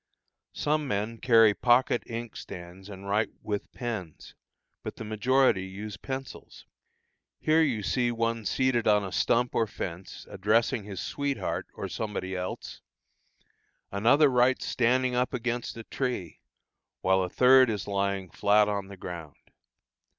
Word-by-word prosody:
Some 150 0 0
men 110 +1 -2
carry 115 -3 +6
pocket 120 +2 +3
inkstands 95 -5 -8
and 100 0 -9
write 105 +2 +1
with 105 -1 -4
pens, 110 - -6 0.5
but - - -6
the - - -7
majority 110 -1 +2
use 100 +2 -7
pencils. 130 +5 -7 0.7
Here 155 +1 +3
you 125 -9 +1
see 120 +3 +1
one 115 -1 -1
seated 130 +1 +1
on 105 -1 +4
a 95 - -5
stump 120 +5 +1
or 115 - +1
fence, 90 -2 -7
addressing 115 +3 +1
his 100 -3 -7
"sweet 140 -1 -2
heart" - - -3
or - - -4
somebody 95 -3 -4
else; 90 0 -5 1.1
another 120 +10 +4
writes 125 0 +2
standing 125 +1 +1
up 125 +1 0
against 120 -1 -3
a 115 - -7
tree, 120 - -4 0.6
while 95 0 +3
a 90 - -2
third 130 +3 +6
is 105 -3 -3
lying 100 -2 -1
flat 105 +3 +3
on 100 -2 -2
the 100 0 -11
ground. 85 -5 -8
110 Hz, 140 wpm, -28 LUFS, 100-125 Hz, 1.1 s, carry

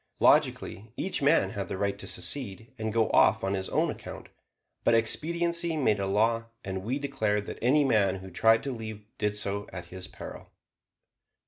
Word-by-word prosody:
Logically, 105 +3 +2
each 190 - -1
man 150 +4 +4
had 100 -2 -4
the 95 - -4
right 100 0 -1
to - - -8
secede, 115 -2 -4
and 110 0 -2
go 110 0 +2
off - - +5
on 95 0 0
his 95 -1 -2
own - - +1
account, - - -9 0.5
but 115 - +4
expediency 170 +7 +1
made 110 -8 +2
a 100 - -1
law 115 +3 +2 0.2
and 95 -1 -4
we 125 +6 -1
declared 110 -8 -1
that - - -7
any 140 +5 +4
man 105 -8 +3
who 95 0 -9
tried 110 +5 +4
to 140 - -2
leave 110 -3 -7
did 105 -1 0
so 100 0 -2
at 90 -2 -6
his 90 0 -6
peril. - - -10
110 Hz, 185 wpm, -28 LUFS, 100-130 Hz, 0.5 s, off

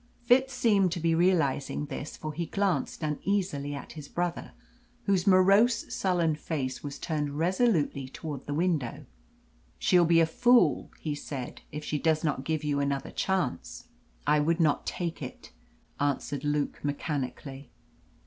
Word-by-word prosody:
Fitz 260 +2 +4
seemed 205 -7 +3
to 180 - -3
be 165 0 +2
realising 160 -5 +1
this, 145 +1 -6
for 155 0 -5
he 170 +2 -3
glanced 195 -3 -1
uneasily 150 -2 -1
at 140 - -8
his 150 -3 -9
brother, 175 +1 -3 0.5
whose 195 -1 +1
morose, 195 +5 +4
sullen 175 -4 +1
face 140 -4 -3
was 145 -1 -5
turned 145 -3 -2
resolutely 170 - +1
towards 145 -1 -7
the 145 - -2
window. 160 -7 -1 0.7
"She'll 175 -1 +4
be 165 0 +5
a 165 - +5
fool," 240 +9 +3
he 155 - -3
said, 140 -3 -6
"if 150 +1 -6
she 150 - -1
does 160 0 +1
not 150 -4 -1
give 155 0 -1
you 145 -1 0
another 140 -1 -1
chance." 190 - -2 0.4
"I 150 - +4
would 165 +3 +1
not 155 -3 +2
take 170 -2 -3
it," - - -8 0.5
answered 145 0 -1
Luke 145 -1 -1
mechanically. 140 -2 -4
160 Hz, 150 wpm, -28 LUFS, 145-180 Hz, 0.7 s, be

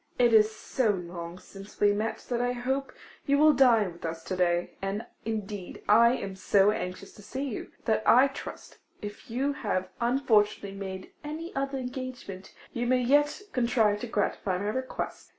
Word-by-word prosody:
It 240 -2 +4
is 215 -1 +7
so 220 +2 -1
long 175 -2 -4
since 195 +2 -13
we 205 0 +5
met 215 +2 -3
that 240 -1 0
I 245 0 +1
hope 265 +3 -2 0.4
you 280 0 +4
will 305 +1 +6
dine 230 -8 +4
with 170 - -16
us 165 0 -4
to 185 - -3
day; 175 -1 +1
and 195 +3 -3 0.2
indeed 210 -4 -5
I 235 +3 +6
am 195 -4 -5
so 200 +1 +4
anxious 190 -1 -5
to - - -14
see 260 +7 -5
you, 265 -7 -5
that 220 -1 +2
I 255 +3 +7
trust, 270 - -9 0.2
if 205 +2 -8
you 270 +5 0
have 185 -9 -2
unfortunately 220 -5 +2
made 190 -1 -6
any 315 +3 -6
other 275 0 -1
engagement, 250 -7 -6 0.2
you 240 0 -1
may 255 0 +3
yet 290 +8 +3
contrive 230 -4 +2
to 245 - -5
gratify 205 -3 -1
my 200 +3 -2
request. 260 +4 -4
220 Hz, 175 wpm, -28 LUFS, 195-255 Hz, 0.4 s, is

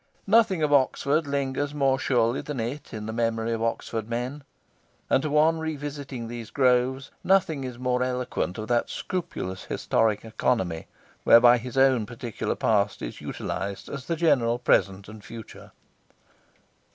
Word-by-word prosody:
Nothing 200 -5 +4
of 150 -1 +2
Oxford 145 +3 +2
lingers 140 +1 -2
more 135 -2 +2
surely 120 -1 +1
than 145 -4 -5
it 120 +6 -4
in 105 -1 -6
the 110 - -4
memory 115 0 0
of 115 - -3
Oxford 115 -1 -2
men; 125 +5 -3 0.7
and - - +4
to 155 - -2
one 155 +2 +3
revisiting 145 -5 -5
these 115 -2 -7
groves 130 0 +1
nothing 165 -7 +2
is 125 -2 -6
more 125 0 0
eloquent 125 -7 -2
of 110 0 -5
that 120 -1 +1
scrupulous 95 - -4
historic 110 -1 0
economy 95 -7 -1 0.4
whereby 120 +1 +7
his 125 +2 -7
own 130 -5 +4
particular 120 -2 -4
past 105 -2 +1
is - - -6
utilised 100 -1 -5
as 140 -2 -6
the 170 - 0
general 140 -8 +2
present 100 -5 +1
and 110 0 -11
future. 115 -1 -11
125 Hz, 150 wpm, -26 LUFS, 115-140 Hz, 0.7 s, whereby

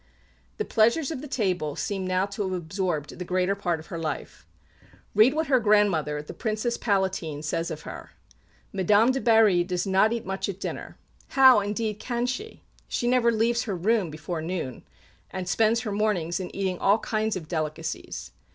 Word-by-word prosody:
The 430 - -1
pleasures 235 +7 +2
of 265 - -4
the 300 - -7
table 180 - -1
seem 195 -2 -3
now 185 +1 +1
to 200 +1 -6
have 190 -2 -1
absorbed 175 -3 -3
the - - -3
greater 185 +2 +1
part 175 -5 -1
of 155 - -11
her 170 - -3
life. 155 -3 -5 0.7
Read 225 +7 +5
what 320 +1 +1
her 265 -3 +3
grandmother, 195 -9 +2
the - - -9
Princess 225 +1 -1
Palatine, 190 -8 -1
says 165 +2 -1
of - - -6
her: - - -8 0.6
"Madame 205 +5 +4
de 265 0 -2
Berry 220 -6 +5
does 180 +1 -2
not 195 +3 +3
eat 235 -1 -2
much 190 +2 -3
at 195 -1 -5
dinner. - - -6 0.4
How, 260 -4 +8
indeed, 210 +1 -2
can 240 0 -2
she? 415 - -5 0.2
She - - -2
never 245 -1 +4
leaves 230 +1 +1
her 205 -5 -2
room 200 +1 +1
before 155 +2 -5
noon, 160 -7 -4 0.5
and 185 -1 -5
spends 225 +4 +2
her 220 -4 -4
mornings 200 -5 0
in 185 - -4
eating 190 -2 -1
all 200 +2 +4
kinds 220 -1 -1
of 170 -4 -6
delicacies. 155 -2 -4
200 Hz, 180 wpm, -26 LUFS, 175-225 Hz, 0.7 s, How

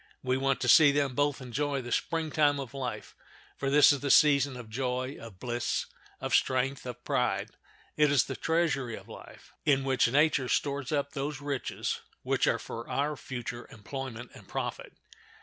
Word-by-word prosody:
We 130 -1 +1
want 135 +1 +1
to - - 0
see 150 -3 +8
them 140 -2 0
both 145 0 0
enjoy 140 +2 -2
the 120 - -7
Spring 160 -2 -1
time 145 -2 +3
of 135 -2 -6
life, 130 -3 -5 0.4
for 135 - -2
this 145 +2 +7
is 145 - 0
the 140 - -3
season 140 -2 +5
of 120 -3 -9
joy, 125 +3 -2
of 115 -5 -11
bliss, 120 +1 -2 0.3
of - - -4
strength, 130 +1 +1
of 120 0 -7
pride; 105 -4 0 0.4
it 150 -1 +4
is 140 -4 +4
the - - -5
treasury 145 -8 0
of - - -12
life, - - -13
in 135 -2 +3
which 130 -2 +2
nature 140 -3 +2
stores 140 -1 -1
up 140 -1 0
those 140 0 -4
riches 140 -2 -3 0.2
which - - +1
are - - +3
for 115 +2 -8
our 145 +4 0
future 120 -2 -6
employment 120 +2 -7
and - - -14
profit. - - -5
135 Hz, 180 wpm, -29 LUFS, 125-145 Hz, 0.4 s, see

